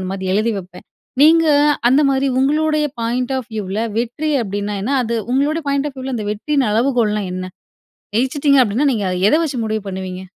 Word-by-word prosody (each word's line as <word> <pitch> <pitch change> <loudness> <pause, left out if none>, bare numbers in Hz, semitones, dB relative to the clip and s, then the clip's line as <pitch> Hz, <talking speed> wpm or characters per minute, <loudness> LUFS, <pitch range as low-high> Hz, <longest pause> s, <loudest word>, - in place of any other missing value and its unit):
அந்த 185 0 -4
மாதிரி 190 -1 -3
எழுதி 220 +2 +1
வைப்பேன். 180 -1 -12 0.4
நீங்க, 325 +1 +6 0.4
அந்த 270 - +4
மாதிரி 270 0 +1
உங்களுடைய 305 +2 +1 0.2
பாயிண்ட் 245 +3 -1
ஆஃப் 250 -2 -8
வியூவ்ல 205 0 -3 0.2
வெற்றி 245 +6 -2
அப்படின்னா, 205 +1 -3
என்ன? 255 +7 -2
அது 230 +1 -2 0.2
உங்களுடைய 295 +4 0
பாயிண்ட் 280 +1 0
ஆஃப் 270 - -25
வியூல, 260 0 -4
அந்த 210 - -4
வெற்றியின் 265 +3 0
அளவுகோல்னா 225 -3 +1
என்ன? 185 - -4 0.7
ஜெயிச்சிட்டிங்க 275 +2 +3
அப்படினா, 235 +8 0
நீங்க 205 -4 -2
அ - - -2 0.2
எதை 305 - +4
வச்சு 275 -6 -3
முடிவு 215 -1 -2
பண்ணுவீங்க? 185 -1 -6
245 Hz, 180 wpm, -18 LUFS, 210-280 Hz, 0.7 s, நீங்க